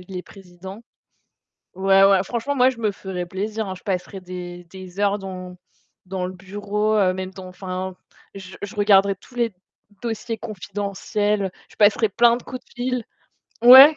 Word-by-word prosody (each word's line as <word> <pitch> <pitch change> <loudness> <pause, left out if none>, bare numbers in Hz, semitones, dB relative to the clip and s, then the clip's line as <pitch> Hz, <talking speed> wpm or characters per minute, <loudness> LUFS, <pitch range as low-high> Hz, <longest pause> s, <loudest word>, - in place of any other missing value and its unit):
il 190 - -6
est 180 - -4
président. 190 +3 -11 0.9
Ouais, 195 +1 +5
ouais, 195 -1 +6
franchement, 240 +7 -2
moi, 255 -1 +6
je 260 - -6
me 220 -2 +1
ferais 190 -2 -5
plaisir, 210 +4 -3
hein, 190 - -4
je 180 - -15
passerais 190 0 -3
des 180 -1 -7
des 185 +2 -10
heures 205 0 +2
dans 185 -2 -7 0.5
dans 185 0 -3
le 185 - -4
bureau, 205 +3 -1
heu, 190 -3 +4
même 185 0 -4
dans 190 -1 -9
enfin, 185 0 -5 0.4
je 190 -1 -9
je 205 +3 -6
regarderai 200 -1 +5
tous 245 - -19
les 235 -4 +1 0.5
dossiers 230 -1 -3
confidentiels, 205 0 -2 0.2
je - - -19
passerais 210 +1 +4
plein 235 +3 +5
de - - -12
coups 255 0 -7
de - - -28
fil. 250 0 -1 0.6
Ouais. 265 +5 +11
195 Hz, 170 wpm, -23 LUFS, 185-215 Hz, 0.9 s, Ouais